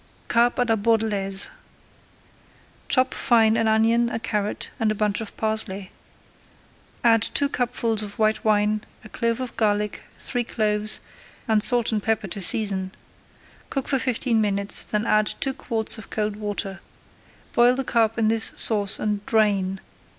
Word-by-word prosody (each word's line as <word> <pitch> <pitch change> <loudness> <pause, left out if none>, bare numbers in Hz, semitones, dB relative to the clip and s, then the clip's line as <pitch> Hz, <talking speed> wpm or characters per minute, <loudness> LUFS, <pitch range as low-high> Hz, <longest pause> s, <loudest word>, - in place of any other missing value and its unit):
CARP 240 +1 +3
À 245 -1 +1
LA 225 -1 +2
BORDELAISE 205 -3 0 1.4
Chop 260 -1 +3
fine 225 -3 +3
an 225 -1 +2
onion, 225 +2 +3
a 235 - -2
carrot, 210 -2 -3
and 220 -1 +2
a - - -1
bunch 210 +1 0
of 220 - -8
parsley. 215 -3 -1 1.1
Add 225 -2 +5
two 280 +6 +1
cupfuls 240 -4 -1
of 205 -1 -7
white 215 0 +1
wine, 210 0 +2 0.2
a 215 - -12
clove 230 +1 -1
of 255 -2 -5
garlic, 210 -1 0 0.2
three 245 -2 0
cloves, 215 -2 0 0.5
and 220 -2 +3
salt 240 +1 +2
and 215 -2 0
pepper 220 0 0
to 195 +2 -5
season. 190 -1 +1 0.8
Cook 275 - -3
for 270 - +1
fifteen 240 -2 0
minutes, 200 -1 0
then 210 +1 -1
add 215 -1 +2
two 270 - -1
quarts 225 -4 -2
of 220 - -11
cold 210 -1 -2
water. 205 -2 -4 0.7
Boil 240 +1 +5
the 270 - -1
carp 225 -3 +1
in 225 -1 +2
this 225 0 +2
sauce 205 -3 0
and 210 -1 -2
drain. 200 -4 +2
220 Hz, 155 wpm, -24 LUFS, 210-230 Hz, 1.4 s, Add